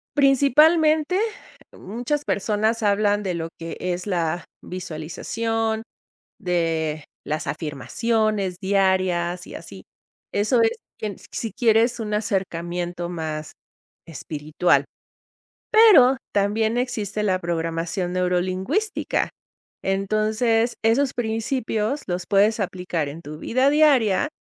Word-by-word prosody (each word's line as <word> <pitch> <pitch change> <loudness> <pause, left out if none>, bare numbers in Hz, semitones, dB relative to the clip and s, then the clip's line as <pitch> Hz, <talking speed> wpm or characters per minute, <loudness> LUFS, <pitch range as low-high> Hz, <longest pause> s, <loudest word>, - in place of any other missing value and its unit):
principalmente, 305 +5 +4 0.6
muchas 245 +8 -3
personas 215 +3 0
hablan 205 0 +2
de 185 - -2
lo 165 -1 -4
que 165 0 -7
es 180 +1 -3
la 175 -3 -1 0.2
visualización 220 +7 -3 0.6
de 165 -5 -1 0.2
las 155 +2 -3
afirmaciones 200 - -1
diarias, 185 -3 +1
y - - -10
así. - - -10 0.5
Eso 230 +4 +2
es 225 - +1 0.2
que, 215 - -3
mm, - - -9
si 225 - -4
quieres 230 +1 +3
un 210 -1 -3
acercamiento 175 -4 -2
más 155 -2 -5 0.5
espiritual. 155 +1 0 0.9
Pero, 350 - +7 0.2
también 220 +3 +1
existe 215 -4 -2
la 185 -3 +1
programación 170 +1 -2
neurolingüística. 185 - 0 0.5
Entonces, 215 +4 +1
esos 255 +4 +2
principios 225 +2 -1
los 180 0 -2
puedes 210 +3 +3
aplicar 180 -5 -2
en 160 +4 -9
tu 150 0 -9
vida 260 +8 +2
diaria 285 -7 +4
205 Hz, 105 wpm, -23 LUFS, 175-230 Hz, 0.9 s, Pero